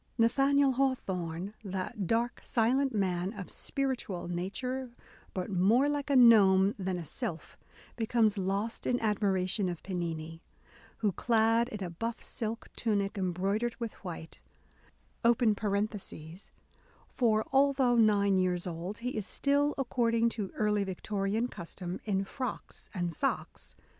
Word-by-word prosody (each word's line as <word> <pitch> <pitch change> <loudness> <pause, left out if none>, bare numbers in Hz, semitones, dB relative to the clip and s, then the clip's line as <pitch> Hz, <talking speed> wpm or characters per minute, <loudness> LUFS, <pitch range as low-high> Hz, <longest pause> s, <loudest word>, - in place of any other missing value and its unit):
Nathaniel 270 +4 +4
Hawthorne, 195 -9 -1
that 190 0 -4
dark 235 +4 0
silent 260 +4 +2
man 185 -2 0
"of 200 -4 -7
spiritual 255 -11 -2
nature, 250 +9 -3 0.4
but 185 +1 -4
more 210 +9 +4
like 290 0 -2
a 280 - +3
gnome 205 -5 +7
than 185 -1 -1
a 170 - -6
sylph," 160 +1 -5 0.4
becomes 225 -2 +2
lost 200 +3 -2
in 245 - +2
admiration 195 -2 +1
of 175 -2 -6
Pennini, 165 -3 -4 0.6
who, 210 -3 +1
clad 230 +3 +2
in 210 -5 -5
a 175 - -4
buff 225 +7 -4
silk 225 0 -5
tunic 200 -3 0
embroidered 195 +5 -1
with 230 -2 -4
white, 165 -3 -7 0.8
(for 215 - -1
although 270 -2 +4
nine 200 -4 +4
years 180 -1 0
old, 180 +3 -5
he 245 +2 -3
is 215 -4 -3
still, 285 +1 +1
according 235 -3 +2
to 210 -4 -4
early 210 -1 +1
Victorian 200 +4 -1
custom, 180 -3 -6
in 195 -2 +1
frocks 255 +5 -6
and 175 -2 -1
socks - - -3
210 Hz, 125 wpm, -31 LUFS, 185-235 Hz, 0.8 s, gnome